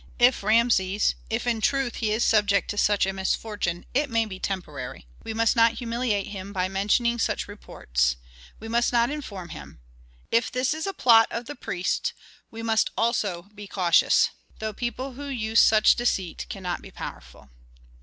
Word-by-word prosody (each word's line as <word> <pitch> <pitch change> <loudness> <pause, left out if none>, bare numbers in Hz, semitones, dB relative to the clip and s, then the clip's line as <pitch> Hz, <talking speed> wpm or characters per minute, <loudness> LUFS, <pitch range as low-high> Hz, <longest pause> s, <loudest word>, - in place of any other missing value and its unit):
If 245 +1 +4
Rameses 210 -2 +2 0.2
if 225 +2 -2
in 230 -2 0
truth 270 -1 0
he 220 -3 -1
is 220 +2 +1
subject 205 -2 +2
to 205 - -6
such 205 -2 +3
a 195 - -2
misfortune, 190 -2 -2
it 285 +2 +1
may 230 -1 +1
be 190 -3 -8
temporary. 185 - -5 0.2
We - - -5
must 225 +2 +2
not 230 0 +5
humiliate 230 -3 -1
him 200 -1 -7
by 185 -2 -1
mentioning 210 +5 +1
such - - -1
reports, - - -1 0.4
we 225 - -8
must 235 +1 +1
not 235 +1 +2
inform 200 -12 -6
him. - - -10 0.5
If 230 +1 +2
this 255 +3 0
is 315 +4 -4
a 390 - -2
plot 230 -8 +6
of 235 +1 -4
the 290 - -6
priests 245 - -2 0.4
we 225 0 -8
must 225 -1 +2
also 210 -7 0
be 205 -1 -10
cautious. 180 -4 +3 0.3
Though 220 0 -4
people 255 +4 -4
who 285 +3 -8
use 225 -4 +1
such 215 -1 +6
deceit 195 -8 -2
cannot 180 -3 -4
be - - -11
powerful." - - -10
220 Hz, 175 wpm, -25 LUFS, 195-240 Hz, 0.5 s, plot